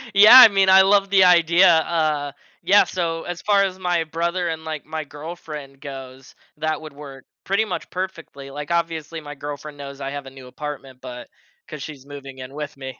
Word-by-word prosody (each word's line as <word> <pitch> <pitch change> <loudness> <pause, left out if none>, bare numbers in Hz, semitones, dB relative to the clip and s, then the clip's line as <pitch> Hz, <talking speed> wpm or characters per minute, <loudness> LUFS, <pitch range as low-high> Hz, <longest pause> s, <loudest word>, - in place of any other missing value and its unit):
Yeah, 210 +5 +9
I 255 - +12
mean, 195 -1 +2
I 190 0 +8
love 195 0 +3
the 190 -1 +5
idea. 175 +1 +5
Uh, 155 -3 +1 0.3
yeah, 200 +4 +5
so 165 -2 -3
as 175 -1 -7
far 200 -1 +3
as 190 -1 -3
my 175 -2 0
brother 170 +3 -2
and, 160 0 -5
like, 155 -2 -6
my 155 0 -5
girlfriend 145 -2 -10
goes, 135 -1 -10 0.2
that 155 0 -2
would 155 -2 -10
work 140 -2 -12 0.2
pretty 200 +3 0
much 185 -4 -6
perfectly. 165 -7 -7
Like, 145 +3 -7
obviously, 165 -1 -3
my 145 -1 -9
girlfriend 145 +1 -8
knows 140 0 -9
I 135 0 -4
have 145 -1 -7
a - - -9
new 135 -1 -13
apartment, 135 -1 -8
but, 125 -1 -9 0.4
'cause 150 -2 -9
she's 140 -3 -10
moving 140 -2 -11
in 130 +1 -9
with 150 0 -7
me. 130 -1 -8
155 Hz, 200 wpm, -21 LUFS, 140-175 Hz, 0.4 s, I